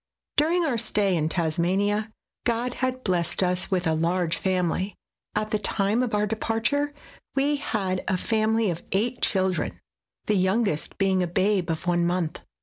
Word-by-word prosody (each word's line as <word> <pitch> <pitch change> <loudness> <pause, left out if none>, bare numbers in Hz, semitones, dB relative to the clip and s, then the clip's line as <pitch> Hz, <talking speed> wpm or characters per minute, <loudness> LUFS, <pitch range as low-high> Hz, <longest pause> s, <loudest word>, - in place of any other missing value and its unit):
During 335 +4 +3
our 250 -7 0
stay 205 -4 +2
in 155 -1 +1
Tasmania, 190 +6 0 0.3
God 240 +1 0
had 255 0 -1
blessed 180 -1 +1
us 180 0 +1
with 185 -2 0
a 160 - +2
large 170 +1 +1
family; 185 +1 0 0.4
at 215 0 -1
the 215 - +1
time 205 +2 +1
of 245 -4 0
our 210 0 +2
departure 225 +7 0 0.4
we 285 +2 +2
had 195 -9 -2
a 190 - +2
family 220 0 +1
of 170 0 -5
eight 230 +6 0
children, 180 - 0 0.5
the 215 - +2
youngest 190 -3 +1
being 190 -2 +2
a 180 - +1
babe 190 0 +1
of 165 +2 -2
one 175 -1 +2
month. 175 -2 -1
195 Hz, 160 wpm, -25 LUFS, 180-225 Hz, 0.5 s, During